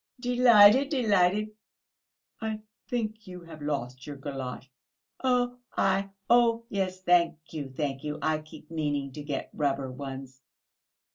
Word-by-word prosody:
"Delighted, 245 0 +6
delighted!..." 210 - +2 0.9
"I 220 -1 -3 0.3
think 220 -4 -3
you 180 -1 -9
have 165 -2 -12
lost 130 -3 -4
your 145 -1 -6
galosh...." 135 -2 -6 0.6
"I 245 -6 0 0.2
oh, 235 -1 +4
yes, 185 -2 -2
thank 175 -2 +4 0.2
you, 145 -4 -4
thank 135 0 -3
you. 150 0 -3
I 155 -1 0
keep 155 0 -14
meaning 145 -4 -2
to 150 - -8
get 145 -2 -4
rubber 135 -3 -1
ones." 135 0 -8
170 Hz, 125 wpm, -28 LUFS, 140-220 Hz, 0.9 s, Delighted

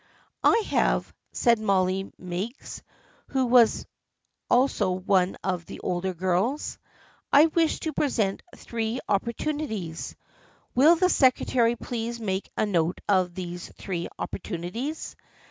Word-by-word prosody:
" - - -32
" - - -46
I 455 - +3
have," - - +1 0.2
said 235 -3 +3
Molly 195 -2 +1
Meigs, 185 +8 -6 0.5
who 265 -2 +1
was 240 -2 +4 0.6
also 250 -5 +3
one 185 0 +1
of 180 -3 -2
the - - -8
older 180 +1 -2
girls. 185 - -1 0.3
" - - -33
I 290 +3 +8
wish 325 0 +1
to 315 - -3
present 220 -9 0
Three 230 +1 -3
Oppor 220 +4 0
tunities. 220 - -4 0.6
Will 300 +7 +6
the 365 +2 +3
secretary 250 -6 +3
please 235 0 -4
make 195 -3 -2
a - - +2
note 175 -4 0
of 185 -3 +2
these 175 -1 -6
Three 175 -3 -4
Opportunities? 210 - -5
215 Hz, 130 wpm, -26 LUFS, 185-255 Hz, 0.6 s, I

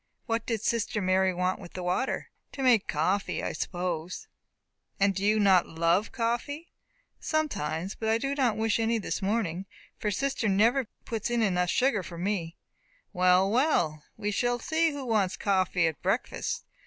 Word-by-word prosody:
"What 225 0 -2
did 225 -3 -1
sister 230 -2 0
Mary 190 0 +2
want 180 +1 -1
with 175 - -11
the 180 - -5
water?" 180 +9 -1 0.2
"To 270 - -4
make 240 -6 +4
coffee, 185 +7 0
I - - -2
suppose." 175 -1 -3 0.7
"And 195 0 +3
do 195 - -4
you 215 +1 +3
not 190 -3 +5
love 170 +5 +1
coffee?" 245 +7 -2 0.5
"Sometimes; 195 - -1
but 220 - -3
I 225 - +4
do 275 +4 -2
not 260 -6 +1
wish 225 0 +1
any 225 +1 +2
this 215 - -3
morning, 195 -3 -1 0.3
for 210 - -1
sister 265 +1 0
never 230 +6 +3 0.2
puts 225 -1 -3
in 240 -1 +1 0.3
sugar 255 +5 +2
enough 185 - -6
for 170 - -8
me." 175 -2 -2 0.6
"Well, 185 +1 +4
well, 175 - +2
we 210 -1 -2
shall 245 +4 +1
see 325 +5 +1
who 285 -3 -5
wants 210 -6 +1
coffee 185 -3 +1
at 160 -2 -2
breakfast. - - -1
205 Hz, 165 wpm, -28 LUFS, 185-235 Hz, 0.7 s, not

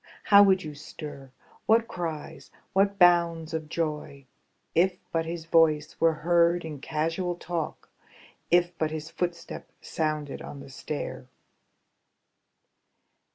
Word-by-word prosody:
How 200 -1 +8
would 190 -2 +5
you 155 -1 -6
stir, 145 -2 -9 0.4
what 230 +1 +4
cries, 165 -6 -6 0.2
what 200 +1 +2
bounds 170 -3 +4
of 160 -1 -3
joy. 150 -4 -3 0.5
If 180 +2 +3
but 165 -1 -1
his 165 -1 -5
voice 155 -2 +2
were 165 0 +5
heard 170 0 +3
in 150 -3 -6
casual 165 +4 -1
talk. 170 -2 -5 0.6
If 175 0 +3
but 155 - +1
his 155 0 -6
footstep 175 -1 -4
sounded 155 -3 -3
on 140 - -8
the 135 - -11
stair! 130 -2 -5
165 Hz, 120 wpm, -27 LUFS, 155-175 Hz, 0.6 s, How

